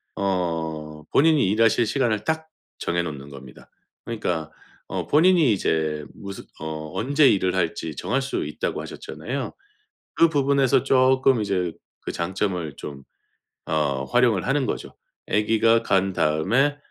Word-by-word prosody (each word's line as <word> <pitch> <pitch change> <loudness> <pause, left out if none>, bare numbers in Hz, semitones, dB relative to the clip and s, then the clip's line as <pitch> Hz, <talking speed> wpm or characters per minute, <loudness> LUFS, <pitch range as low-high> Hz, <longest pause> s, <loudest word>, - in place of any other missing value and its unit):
어 80 -5 -2
본인이 155 -7 +4
일하실 115 +2 +3
시간을 110 -3 0
딱 160 +4 -2 0.3
정해 85 0 0
놓는 70 -3 -7
겁니다. 65 -2 -13 0.4
그러니까 85 -9 -3 0.4
어 - - -3
본인이 160 - +4
이제 80 -5 -1
무슨 100 -1 -8
어 80 0 -6
"언제 140 +4 +4
일을 95 -2 +2
할지 80 -3 -2
정할 125 - -1
수 135 - -2
있다."고 75 - -3
하셨잖아요. 130 +3 -6 0.6
그 165 - +5
부분에서 140 -4 +2
쪼끔 130 -1 +4
이제 90 -4 -1 0.3
그 - - -5
장점을 90 -3 -2
좀 70 -2 -8 0.7
어 70 -4 0
활용을 120 -6 +3
하는 135 0 +1
거죠. - - -4 0.3
'아기가 115 +2 +3
간 95 -2 +1
다음에 100 - +2
100 Hz, 275 characters per minute, -24 LUFS, 80-130 Hz, 0.7 s, 그